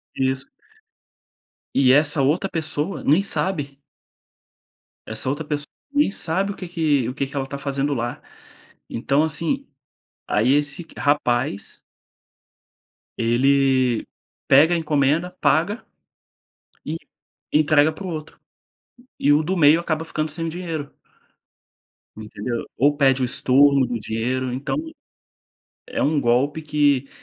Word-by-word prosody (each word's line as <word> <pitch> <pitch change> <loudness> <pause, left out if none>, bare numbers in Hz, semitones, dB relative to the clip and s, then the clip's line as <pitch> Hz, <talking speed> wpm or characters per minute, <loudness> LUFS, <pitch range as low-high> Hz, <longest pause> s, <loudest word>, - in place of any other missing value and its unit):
Isso. 130 0 -1 1.3
E 130 -2 +5
essa 145 +1 +4
outra 165 +8 +1
pessoa 160 +2 -3
nem 155 +7 +4
sabe 145 -9 -2 1.3
Essa 110 +4 -3
outra 145 +3 -3
pessoa 145 -1 -3 0.3
nem 285 -7 +2
sabe, 190 +3 -1
o 200 - -7
que 185 - -7
que 150 -8 +1
o - - -5
que 140 0 -2
que 140 - -13
ela 135 - 0
está 140 +1 -6
fazendo 140 +1 -1
lá, 120 -1 -3 0.7
então 140 +6 +1
assim, 165 - -2 0.6
aí 120 +6 +2
esse 145 +3 -1
rapaz 145 -1 0 1.4
ele 130 +1 +2 0.4
pega 155 +6 +6
a - - +2
encomenda, 155 +2 +1
paga, 195 +9 +1 1.0
e 155 +2 -3 0.6
entrega 155 0 +4
para 190 +4 -8
o - - -4
outro. 155 -1 -7 0.8
E 145 - +3
o 150 +2 +4
do 185 +4 -2
meio 155 +1 +5
acaba 160 -2 -2
ficando 155 -1 -3
sem 165 +1 -4
o - - -2
dinheiro. 165 -4 -5 1.3
Entendeu? 110 +2 -5
Ou 145 +2 +3
pede 135 -2 +3
o - - +2
estorno 135 +2 +3
do 120 -2 -3
dinheiro 125 +4 -2
então, 130 +3 -3 1.1
é - - -2
um 150 -1 +2
golpe 130 +6 +1
que, 145 -3 +1
145 Hz, 130 wpm, -22 LUFS, 130-160 Hz, 1.4 s, pega